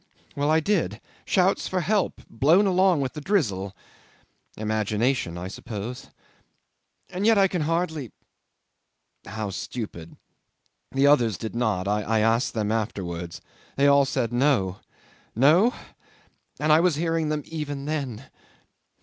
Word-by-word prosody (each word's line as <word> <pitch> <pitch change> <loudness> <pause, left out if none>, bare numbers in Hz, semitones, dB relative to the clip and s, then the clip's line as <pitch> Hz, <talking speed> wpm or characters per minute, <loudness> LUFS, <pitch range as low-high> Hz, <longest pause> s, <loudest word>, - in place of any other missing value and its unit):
Well, 145 +1 0
I 160 +1 +4
did. 160 - 0 0.3
Shouts 190 +1 +2
for 185 -1 -1
help... 200 +4 0
blown 160 - +3
along 185 -4 +3
with 130 -2 -2
the 150 - -7
drizzle. 100 - -1 0.8
Imagination, 110 -2 -1
I 90 +1 -5
suppose. 110 +4 -7 1.0
And 185 +2 -3
yet 225 0 +5
I 195 -1 +5
can 180 -3 -2
hardly... 160 - -1 1.2
How 105 -1 -4
stupid.... 95 -5 -7 0.7
The 135 +1 +2
others 120 -9 +4
did 110 - -6
not. 105 -6 0
I 105 +2 0
asked 115 +4 +1
them 105 -1 -1
afterwards. 90 -6 -3 0.3
They 140 - +2
all 140 0 +5
said 125 -3 -2
No. 120 -8 +1 0.6
No? 160 - +5 0.9
And 150 +1 +2
I 155 - +6
was 175 -2 +3
hearing 165 0 0
them 150 -1 -2
even 145 -3 -5
then! 135 -6 -4
135 Hz, 130 wpm, -25 LUFS, 110-160 Hz, 1.2 s, I